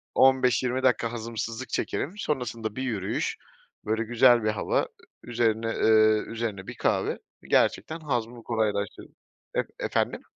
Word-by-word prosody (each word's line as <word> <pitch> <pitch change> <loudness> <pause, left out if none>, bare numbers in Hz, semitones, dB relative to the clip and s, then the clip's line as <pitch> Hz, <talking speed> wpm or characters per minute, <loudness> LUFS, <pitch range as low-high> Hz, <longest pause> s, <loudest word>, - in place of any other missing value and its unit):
15-20 130 -1 +3
dakika 120 -2 +2
hazımsızlık 115 +1 -5
çekerim. 160 - -2
Sonrasında 120 - -3
bir 130 - -3
yürüyüş, 105 -7 -2 0.5
böyle, 110 +1 0
güzel 120 0 +5
bir 110 - +2
hava, 105 - +1
ı - - -4 0.4
üzerine, 115 -2 0
ııı, 110 -1 +4
üzerine 110 -4 -4
bir - - -7
kahve, - - 0 0.2
gerçekten, 160 +1 +1
hazmımı 120 -5 -3
kolaylaştırır 105 -4 -2 0.5
E - - -3
efendim? - - -1
115 Hz, 125 wpm, -27 LUFS, 110-125 Hz, 0.5 s, güzel